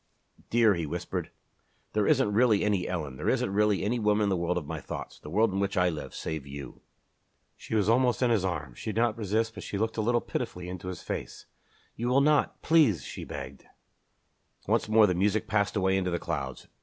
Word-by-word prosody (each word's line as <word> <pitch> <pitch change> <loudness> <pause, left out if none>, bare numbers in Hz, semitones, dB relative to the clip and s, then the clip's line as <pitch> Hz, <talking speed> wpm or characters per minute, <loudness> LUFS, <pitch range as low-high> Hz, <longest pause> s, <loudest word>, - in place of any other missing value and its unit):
"Dear," 115 -2 +5
he 85 -4 -3
whispered, - - -4 0.6
"there - - +1
isn't 105 - +3
really 110 -2 +4
any 100 -4 +1
Ellen, 75 -7 -4
there - - -1
isn't 95 - 0
really 105 -1 +2
any 120 +4 0
woman 105 -1 +2
in 100 - +2
the 95 - +2
world 85 0 -1
of 85 - -3
my - - -5
thoughts, - - -7
the - - -10
world 105 +4 +2
in 95 - -1
which 100 0 -1
I 90 0 +4
live, 80 -3 -6
save 80 -3 -4
you." 70 -1 -9 0.7
She - - -5
was 105 -3 +2
almost 125 +2 +3
in 120 - +3
his 110 -5 +2
arms. 75 -9 -4
She 110 - -3
did 110 +2 0
not 115 -3 +2
resist 110 +1 -1
but - - -8
she 100 - -4
looked 110 +2 -1
a - - +1
little 120 +2 +2
pitifully 90 -5 -4
into 90 0 -7
his 90 -3 -6
face. - - -5 0.5
"You 120 - -3
will 130 +3 +4
not 150 0 +2
please!" 155 - +4
she - - -7
begged. - - -8 1.0
Once - - +1
more 110 0 +6
the 90 - +2
music 100 +4 +1
passed 105 0 +1
away 95 -1 +2
into 95 -1 0
the 85 - 0
clouds. - - -4
105 Hz, 220 wpm, -28 LUFS, 90-110 Hz, 1.0 s, more